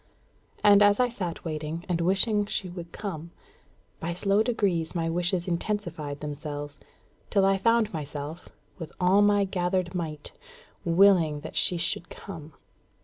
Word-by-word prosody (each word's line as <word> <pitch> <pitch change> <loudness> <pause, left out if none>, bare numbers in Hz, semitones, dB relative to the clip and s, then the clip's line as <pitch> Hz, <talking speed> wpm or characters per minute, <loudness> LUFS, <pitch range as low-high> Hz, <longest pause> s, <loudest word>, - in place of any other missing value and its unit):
And, 205 -1 +7
as 205 +1 +5
I 250 -1 +3
sat 180 -9 -5
waiting, 155 +2 -4
and 170 -2 0
wishing 200 +4 +2
she 195 - -2
would 175 -1 -8
come, 170 -6 -6 0.7
by 170 +1 -3
slow 195 +4 +2
degrees 195 -9 0
my 165 -1 0
wishes 175 +1 0
intensified 170 -6 -3
themselves, 145 -1 -6 0.5
till 195 -2 +3
I 195 0 +3
found 230 -1 +2
myself, 150 +1 -6 0.3
with 165 - -7
all 185 +3 +4
my 205 0 +4
gathered 180 -1 -1
might, 155 -4 -5 0.5
willing 170 -4 +4
that 160 - -8
she 180 - +2
should 175 0 -2
come. 160 -6 -9
175 Hz, 145 wpm, -27 LUFS, 160-200 Hz, 0.7 s, And